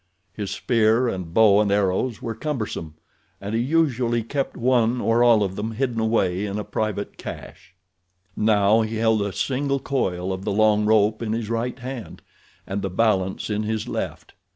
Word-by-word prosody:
His 100 Hz, -2 st, -5 dB
spear 115 Hz, +1 st, +2 dB
and 90 Hz, -7 st, -4 dB
bow 105 Hz, +1 st, +5 dB
and 105 Hz, -2 st, +1 dB
arrows 100 Hz, +4 st, 0 dB
were 115 Hz, -, -3 dB
cumbersome 110 Hz, -, -4 dB, 0.4 s
and 100 Hz, +2 st, -5 dB
he 115 Hz, -, +1 dB
usually 125 Hz, -5 st, +1 dB
kept 135 Hz, +4 st, -3 dB
one 120 Hz, -1 st, +2 dB
or 115 Hz, +1 st, +2 dB
all 115 Hz, -3 st, +5 dB
of 95 Hz, -1 st, -3 dB
them 110 Hz, +3 st, -4 dB
hidden 120 Hz, -1 st, -1 dB
away 105 Hz, -3 st, +1 dB
in 100 Hz, +1 st, -4 dB
a 105 Hz, -, -3 dB
private 105 Hz, -2 st, -3 dB
cache. 90 Hz, -, -9 dB, 0.6 s
Now 105 Hz, 0 st, +3 dB
he 110 Hz, +1 st, -3 dB
held 110 Hz, -1 st, +2 dB
a 100 Hz, 0 st, -1 dB
single 140 Hz, +6 st, -1 dB
coil 95 Hz, -10 st, -2 dB
of 95 Hz, +1 st, -6 dB
the 105 Hz, -, -1 dB
long 105 Hz, 0 st, +3 dB
rope 110 Hz, 0 st, +3 dB
in 110 Hz, -2 st, -2 dB
his 115 Hz, -1 st, -3 dB
right 120 Hz, +2 st, -2 dB
hand, 125 Hz, -7 st, -8 dB, 0.4 s
and 100 Hz, +1 st, -3 dB
the 95 Hz, -, -2 dB
balance 95 Hz, 0 st, 0 dB
in 105 Hz, 0 st, 0 dB
his 110 Hz, 0 st, -2 dB
left. -, -, -5 dB
110 Hz, 175 wpm, -23 LUFS, 100-120 Hz, 0.6 s, bow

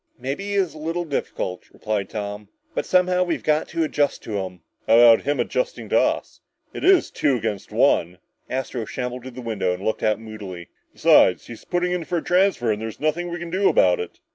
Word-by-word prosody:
"Maybe 135 Hz, +10 st, -4 dB
he 205 Hz, -, -3 dB
is 190 Hz, -6 st, +1 dB
a 155 Hz, -, -11 dB
little 165 Hz, +3 st, -2 dB
difficult," 95 Hz, -, -4 dB
replied 105 Hz, -3 st, -3 dB
Tom, 105 Hz, -1 st, -6 dB, 0.2 s
"but -, -, -2 dB
somehow, 180 Hz, 0 st, +3 dB
we've 175 Hz, -2 st, -2 dB
got 155 Hz, 0 st, +1 dB
to 165 Hz, -, -1 dB
adjust 145 Hz, -2 st, 0 dB
to 105 Hz, -3 st, -3 dB
him!" 90 Hz, -2 st, -6 dB, 0.3 s
"How 115 Hz, -, +6 dB
about 115 Hz, -1 st, +7 dB
him 145 Hz, +1 st, 0 dB
adjusting -, -, -2 dB
to -, -, +4 dB
us? -, -, -1 dB, 0.3 s
It's 380 Hz, -2 st, +3 dB
two 140 Hz, -3 st, +1 dB
against 110 Hz, -4 st, -4 dB
one!" 85 Hz, +2 st, +2 dB, 0.3 s
Astro 130 Hz, -3 st, -3 dB
shambled 125 Hz, +2 st, -5 dB
to -, -, -5 dB
the 125 Hz, 0 st, -9 dB
window 100 Hz, -6 st, -1 dB
and 90 Hz, -, -10 dB
looked 110 Hz, -, -1 dB
out 110 Hz, 0 st, +1 dB
moodily. 105 Hz, -6 st, -9 dB, 0.2 s
"Besides, -, -, +4 dB
he's 115 Hz, -, -11 dB
putting 180 Hz, 0 st, 0 dB
in 180 Hz, -1 st, -1 dB
for 175 Hz, -, -1 dB
a 165 Hz, -, -3 dB
transfer 180 Hz, -, +2 dB
and 105 Hz, 0 st, -2 dB
there's 110 Hz, -1 st, -6 dB
nothing 160 Hz, +3 st, -1 dB
we 175 Hz, -, -4 dB
can 170 Hz, 0 st, -7 dB
do 195 Hz, +2 st, +3 dB
about -, -, +4 dB
it!" 445 Hz, -, -6 dB
130 Hz, 210 wpm, -23 LUFS, 110-175 Hz, 0.3 s, about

